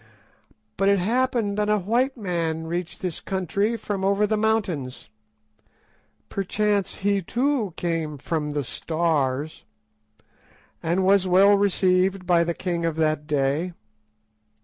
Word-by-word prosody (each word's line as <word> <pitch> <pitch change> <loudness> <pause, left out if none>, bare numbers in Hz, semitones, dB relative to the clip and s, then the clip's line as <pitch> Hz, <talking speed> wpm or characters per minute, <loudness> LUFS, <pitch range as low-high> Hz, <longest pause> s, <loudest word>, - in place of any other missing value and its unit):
But 195 +1 +3
it 200 - +4
happened 225 0 0
that 210 0 +1
a 210 - +3
white 240 +8 0
man 165 -5 -2
reached 175 +1 -4
this 180 -4 -3
country 195 +4 -1
from 200 -3 -4
over 200 +2 +2
the 215 +1 0
mountains—perchance 200 -12 -1 1.9
he 200 0 0
too 240 - -1
came 165 -3 -2
'from 150 +1 -2
the 145 -1 -1
Stars'—and 135 - -4
was 195 -1 +4
well 195 +3 +6
received 190 -1 +2
by 170 -1 +4
the 170 0 -2
king 175 -2 -2
of 165 -2 0
that 155 -2 0
day. 150 +5 0
180 Hz, 120 wpm, -24 LUFS, 160-200 Hz, 1.9 s, well